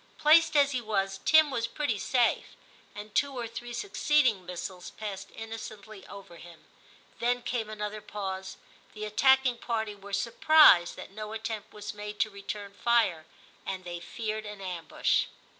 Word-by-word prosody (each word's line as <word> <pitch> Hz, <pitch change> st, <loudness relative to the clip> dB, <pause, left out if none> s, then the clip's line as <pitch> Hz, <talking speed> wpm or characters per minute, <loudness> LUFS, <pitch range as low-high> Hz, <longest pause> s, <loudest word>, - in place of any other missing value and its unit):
Placed 315 Hz, 0 st, +5 dB
as 285 Hz, -1 st, +5 dB
he 255 Hz, -3 st, -1 dB
was, 195 Hz, -3 st, -1 dB
Tim 315 Hz, -2 st, +6 dB
was 230 Hz, -3 st, -1 dB
pretty 240 Hz, -5 st, -2 dB
safe, 245 Hz, 0 st, +1 dB, 0.4 s
and 210 Hz, 0 st, -9 dB
two 280 Hz, +2 st, +1 dB
or 240 Hz, -1 st, -3 dB
three 240 Hz, +1 st, -8 dB
succeeding 255 Hz, -, +1 dB
missiles 180 Hz, 0 st, -6 dB
passed 200 Hz, -3 st, -7 dB
innocently 215 Hz, -2 st, -9 dB
over 195 Hz, -4 st, -11 dB
him. 170 Hz, -1 st, -14 dB, 0.5 s
Then 245 Hz, +1 st, 0 dB
came 230 Hz, -4 st, -2 dB
another 210 Hz, 0 st, -5 dB
pause; 190 Hz, -2 st, -6 dB, 0.4 s
the 215 Hz, 0 st, -5 dB
attacking 260 Hz, +3 st, +3 dB
party 220 Hz, -3 st, -2 dB
were 200 Hz, 0 st, -12 dB
surprised 235 Hz, -, +5 dB
that -, -, -10 dB
no 215 Hz, +1 st, -7 dB
attempt 220 Hz, -1 st, -5 dB
was 210 Hz, -1 st, -7 dB
made 210 Hz, 0 st, -7 dB
to 215 Hz, -1 st, +1 dB
return 200 Hz, 0 st, -7 dB
fire, 205 Hz, -8 st, +1 dB, 0.4 s
and 190 Hz, -1 st, -5 dB
they 175 Hz, -1 st, -6 dB
feared 215 Hz, +4 st, -5 dB
an 210 Hz, -1 st, -8 dB
ambush. 180 Hz, -4 st, 0 dB
215 Hz, 155 wpm, -29 LUFS, 195-240 Hz, 0.5 s, Tim